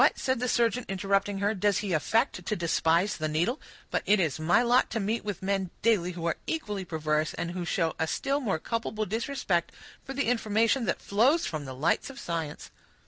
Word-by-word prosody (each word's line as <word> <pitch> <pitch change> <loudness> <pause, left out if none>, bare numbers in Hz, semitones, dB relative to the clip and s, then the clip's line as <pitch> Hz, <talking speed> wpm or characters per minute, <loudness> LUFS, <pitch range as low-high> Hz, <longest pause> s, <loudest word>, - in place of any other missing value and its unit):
said 260 -2 -1
the 250 - -1
surgeon, 235 +1 +2
interrupting 195 +1 0
her, 200 +2 +1
"does 205 -1 +1
he 200 -4 -2
affect 225 - +1
to 215 - -1
despise 170 +2 +2
the 155 - -1
needle? 170 - 0 0.3
But - - +1
it 210 0 +5
is 160 -5 0
my 175 +8 +3
lot 245 +1 +3
to 225 - -2
meet 220 +3 -1
with 205 -3 -5
men, 195 -1 0
daily, 195 -6 +2
who 170 -1 -5
are 170 - 0
equally 210 -12 -2
perverse, 155 -2 -1
and 170 - -3
who 180 0 -4
show 165 -2 0
a 160 - +1
still 275 - 0
more 215 - 0
culpable 220 +3 -2
disrespect 220 - -1 0.3
for 270 - -7
the 280 - 0
information 230 +1 +2
that - - -1
flows 250 +11 +3
from 155 -3 -4
the 130 -1 -7
lights 150 - +1
of 275 0 -10
science." 165 -3 -4
200 Hz, 200 wpm, -28 LUFS, 170-230 Hz, 0.3 s, it